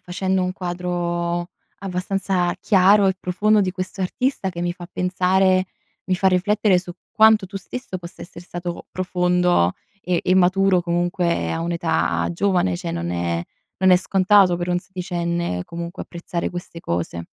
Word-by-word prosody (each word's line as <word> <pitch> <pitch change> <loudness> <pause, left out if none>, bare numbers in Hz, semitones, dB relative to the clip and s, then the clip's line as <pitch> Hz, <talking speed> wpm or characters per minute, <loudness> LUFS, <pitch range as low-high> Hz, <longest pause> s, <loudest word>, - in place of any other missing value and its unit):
facendo 185 +1 -1
un 180 - -2
quadro 175 -1 -3 0.3
abbastanza 185 -1 -1
chiaro 195 0 +5
e 190 - 0
profondo 210 +4 +2
di 185 -2 0
questo 185 +1 -6
artista 200 +3 -1
che 175 -2 -6
mi 175 - -1
fa 175 -1 -11
pensare 185 +1 +2 0.4
mi 185 - 0
fa 190 +1 +3
riflettere 195 +1 +2
su 180 0 -7 0.2
quanto 220 -2 +5
tu 195 +2 -8
stesso 195 0 -6
possa 170 0 -10
essere 170 0 -11
stato 175 0 -6
profondo 180 - +2 0.3
e 180 -2 0
e 185 - +2
maturo 190 0 +4
comunque 175 0 0
a 165 - -2
un'età 170 -1 0
giovane, 175 - +1
cioè 85 - -5
non 85 0 -3
è 85 -1 -1 0.4
non 185 0 +4
è 180 - +8
scontato 190 0 +4
per 175 +1 -4
un 175 - +1
sedicenne, 170 - -3
comunque 170 +2 -6
apprezzare 170 0 -4
queste 175 -1 -7
cose. 85 - -3
180 Hz, 155 wpm, -22 LUFS, 175-190 Hz, 0.4 s, è